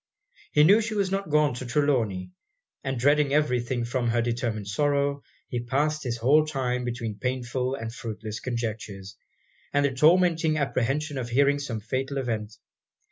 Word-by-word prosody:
He 150 - +6
knew 200 +8 +6
she 215 0 -3
was 195 -2 0
not 195 -3 -2
gone 150 -2 +3
to 125 +1 -6
Trelawny; 120 -10 0 0.5
and 135 -1 -2
dreading 145 +2 +3
every 150 -5 +2
thing 120 0 -2
from 120 0 -1
her 120 +1 +1
determined 115 -3 -2
sorrow, 140 +5 +1 0.3
he 120 - -3
passed 150 +5 0
his 120 -3 -2
whole 140 +7 +4
time 130 -5 -2
between 115 -3 -4
painful 125 0 -2
and 115 -3 -6
fruitless 110 -3 -6
conjectures, 110 -5 -5 0.6
and 145 0 +2
the 140 - +1
tormenting 165 +2 +4
apprehension 140 +1 -1
of 120 -2 -4
hearing 140 +3 +3
of - - -5
some 115 -6 -4
fatal 130 +5 -3
event. 110 -4 -3
130 Hz, 165 wpm, -26 LUFS, 115-145 Hz, 0.6 s, He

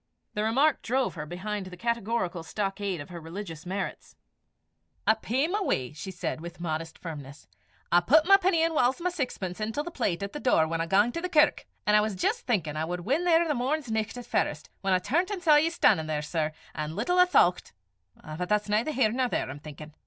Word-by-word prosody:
The 210 - -1
remark 270 +7 +3
drove 255 +2 0
her 150 -3 -6
behind 190 +3 -4
the 180 -1 -10
categorical 230 -5 -1
stockade 195 +2 -3
of 145 - -10
her 175 -2 -8
religious 165 -1 -7
merits. 195 +2 -5 0.9
"I 220 - +6
pey 245 +6 -1
my 400 +5 -1
w'y," 135 - -1
she 160 - -7
said, 175 -3 -4
with 170 +1 -9
modest 160 -1 -4
firmness. 145 -4 -9 0.4
"I 175 - +7
put 300 - +4
my 390 +2 +8
penny, 365 -4 +2
and 330 0 +1
whiles 260 -1 +2
my 360 +1 -1
saxpence, 235 - -4
intil 225 +7 -2
the 345 - -6
plate 200 - -1
at 200 - -5
the 295 - -5
door 160 - +3
whan 165 +1 -2
I 165 - -2
gang 205 +6 +3
to 335 - -4
the 360 - -3
kirk 300 -3 +3 0.2
an' 210 - +3
I 210 - +6
was 215 -1 -2
jist 185 - -1
thinkin' 165 - 0
I 155 - -1
wad 175 +1 -4
win 285 - 0
there 335 -1 +4
the 300 - +1
morn's 265 0 -1
nicht 220 +2 -2
at 245 - -7
farest, 150 -10 -1
whan 195 -1 +2
I - - +5
turnt 325 - 0
an' 405 -3 -4
saw 310 -4 +6
ye 315 +2 +3
stan'in 200 - +3
there, 150 -1 -2
sir; 155 0 -1 0.2
an' 155 +1 -4
little 355 - +1
I 360 - +8
thoucht 180 - +3 0.5
but 160 +4 -5
that's 210 0 +1
neither 215 +7 +1
here 240 -5 +3
nor 255 +2 +1
there, - - -1
I'm 145 - -8
thinkin'. 150 +1 -10
210 Hz, 225 wpm, -28 LUFS, 170-280 Hz, 0.9 s, my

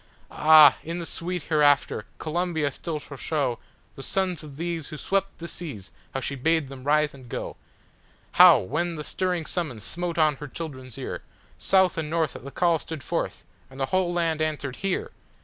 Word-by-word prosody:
Ah, 155 -2 +8
in 165 +2 -4
the 170 - -4
sweet 175 0 -4
hereafter 145 -8 +2
Columbia 160 -2 -1
still 160 +3 -4
shall 145 -1 -10
showThe 135 -5 -1 0.4
sons 185 +3 -1
of 145 -3 -11
these 170 -2 -3
who 155 - -7
swept 195 +6 -1
the 170 - -7
seas 130 - -7 0.2
how - - +1
she 135 - -3
bade 155 +1 +1
them 135 -2 -10
rise 150 +1 +3
and 130 -3 -13
go,—How, - - +2
when 170 - -2
the 150 - -5
stirring 180 0 -1
summons 145 - -3
smote 170 +6 -3
on 155 -3 +3
her 150 - -7
children's 130 -5 -7
ear, - - -5 0.4
South 190 -3 +3
and 155 -2 -3
North 160 -2 0
at - - -9
the 140 - -7
call 170 +2 +2
stood 155 -3 -7
forth, - - -3 0.3
and 135 +1 -12
the 135 - +1
whole 185 -2 +2
land 165 -2 0
answered, 150 -4 -2
"Here!" 310 - -2
155 Hz, 180 wpm, -26 LUFS, 140-170 Hz, 0.4 s, Ah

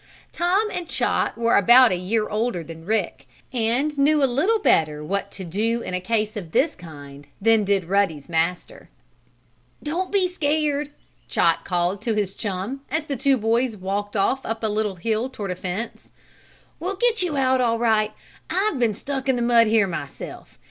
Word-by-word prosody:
Tom 370 +5 +1
and 355 -2 -4
Chot - - 0
were 235 0 +2
about 240 +4 +7
a - - +2
year 210 +5 -1
older 215 -5 -1
than 165 0 -11
Rick, 215 -5 -1 0.3
and 250 +6 0
knew 295 +1 +4
a - - +7
little 285 - +2
better 155 - +2
what 200 +5 -2
to 195 - -8
do 220 +7 -1
in - - -5
a 180 - -1
case 215 +2 -1
of 175 -6 -7
this 315 - +2
kind 145 -5 -12
than 225 +1 +4
did 195 -2 +1
Ruddy's 175 -6 0
master. 170 +2 -2 0.9
"Don't 345 +5 -2
be 390 -2 +3
scared," 295 -4 0 0.4
Chot - - +2
called 180 +2 -1
to 225 0 -1
his 200 -2 -1
chum, 205 +8 -4
as 310 0 -1
the 285 - -3
two 270 +2 +2
boys 230 +1 0
walked 200 +3 -3
off 260 +7 +1
up 225 0 -4
a - - +2
little 210 -2 -1
hill 220 +7 -1
toward 210 -7 -5
a - - -3
fence. 185 +5 -5 0.7
"We'll 380 +4 -3
get 470 +1 +1
you 340 -5 -1
out 260 -1 +2
all 230 -2 +2
right. 220 -2 +2 0.4
I've 385 -6 0
been 230 -4 +2
stuck 270 +3 -4
in 260 - +4
the 240 - -1
mud 235 -1 +5
here 215 -1 +4
myself. 165 -6 -7
225 Hz, 185 wpm, -23 LUFS, 190-270 Hz, 0.9 s, about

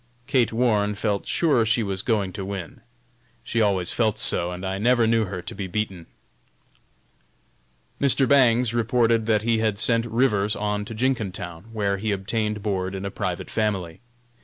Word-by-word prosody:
Kate 125 -4 +2
Warne 110 -3 +1
felt 100 -1 -2
sure 145 -9 +2
she 115 +1 +1
was 95 -2 -2
going 100 -5 -1
to 95 - -5
win. 95 -3 -7 0.6
She 115 - -1
always 95 -4 +1
felt 110 -2 +1
so, 90 -4 +4
and 90 +1 -6
I 95 +1 -3
never 120 +2 +3
knew 115 0 +2
her 90 -2 -6
to - - -7
be 100 -2 -5
beaten. 95 -3 -4 1.9
Mr. 135 -1 +3
Bangs 125 -4 +4
reported 115 -1 +1
that 110 -2 +2
he 115 -1 +1
had 110 -2 0
sent 115 +2 +1
Rivers 110 -3 +1
on 105 0 -2
to 115 - -8
Jenkintown, 105 -8 -3
where 100 -3 -1
he 105 +2 -2
obtained 105 +1 -2
board 95 -2 -2
in 95 +1 -5
a 100 - -4
private 95 -3 -4
family. 95 -7 -2
105 Hz, 165 wpm, -24 LUFS, 95-115 Hz, 1.9 s, so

